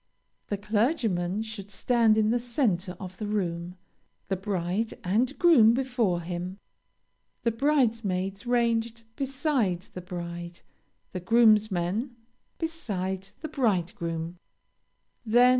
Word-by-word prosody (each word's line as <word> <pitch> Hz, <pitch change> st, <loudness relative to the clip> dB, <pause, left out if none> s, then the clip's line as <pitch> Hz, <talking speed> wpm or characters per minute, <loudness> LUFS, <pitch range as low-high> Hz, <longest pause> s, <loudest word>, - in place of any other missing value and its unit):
The 205 Hz, -, -2 dB
clergyman 210 Hz, -, 0 dB
should 215 Hz, -3 st, -7 dB
stand 225 Hz, +2 st, +3 dB
in 215 Hz, 0 st, +3 dB
the 240 Hz, -, +2 dB
centre 210 Hz, -, -1 dB
of 185 Hz, -1 st, -8 dB
the 210 Hz, -, -3 dB
room, 180 Hz, -4 st, -2 dB, 0.5 s
the 195 Hz, -, +1 dB
bride 190 Hz, +2 st, -2 dB
and 235 Hz, +9 st, +1 dB
groom 245 Hz, -11 st, +6 dB
before 245 Hz, -9 st, 0 dB
him, 175 Hz, +2 st, -5 dB, 0.9 s
the 230 Hz, -, +2 dB
bridesmaids 225 Hz, -6 st, 0 dB
ranged 235 Hz, -1 st, +1 dB
beside 270 Hz, -, 0 dB
the 185 Hz, -, -9 dB
bride, 175 Hz, -1 st, -6 dB, 0.5 s
the 185 Hz, -, -4 dB
groomsmen 215 Hz, +1 st, +3 dB, 0.4 s
beside 195 Hz, -, -3 dB
the 315 Hz, -, -3 dB
bridegroom. 175 Hz, -, -1 dB
210 Hz, 105 wpm, -27 LUFS, 180-235 Hz, 0.9 s, groom